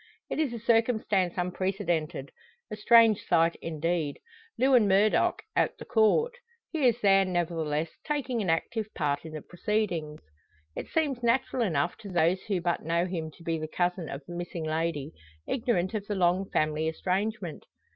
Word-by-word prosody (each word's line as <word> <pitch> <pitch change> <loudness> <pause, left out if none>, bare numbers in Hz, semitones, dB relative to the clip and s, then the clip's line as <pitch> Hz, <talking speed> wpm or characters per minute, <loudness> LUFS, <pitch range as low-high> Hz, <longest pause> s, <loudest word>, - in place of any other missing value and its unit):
It - - -2
is 300 -5 +1
a 235 - -4
circumstance 220 -5 +1
unprecedented 175 -5 -2 0.4
a - - -3
strange 225 0 +5
sight, 165 -1 +3
indeed 165 -1 -2 0.4
Lewin 255 -5 +4
Murdock 200 +2 +3
at - - +1
the - - -9
Court! 240 - +3 0.4
He 305 -6 +2
is 240 0 +1
there, 195 -1 +5
nevertheless, 165 -4 -1
taking 270 -6 -1
an 190 - -1
active 215 +6 -1
part 145 -2 -1
in 160 - -8
the 155 - -6
proceedings. 175 -5 -2 0.5
It - - -5
seems 290 -6 0
natural 245 +1 +1
enough 160 -10 0
to 205 - -9
those 175 +1 +2
who 195 -4 0
but 175 0 0
know 170 +2 0
him 170 -3 -4
to 160 +2 -17
be 165 -1 -1
the 155 - -4
cousin 175 0 -1
of 140 +1 -6
the 175 - -7
missing 175 -1 -5
lady, 155 -2 -2 0.4
ignorant 230 -8 0
of 205 -2 -3
the 205 - -2
long 185 +1 +2
family 155 +1 0
estrangement. 185 +1 -2
180 Hz, 165 wpm, -28 LUFS, 165-220 Hz, 0.5 s, strange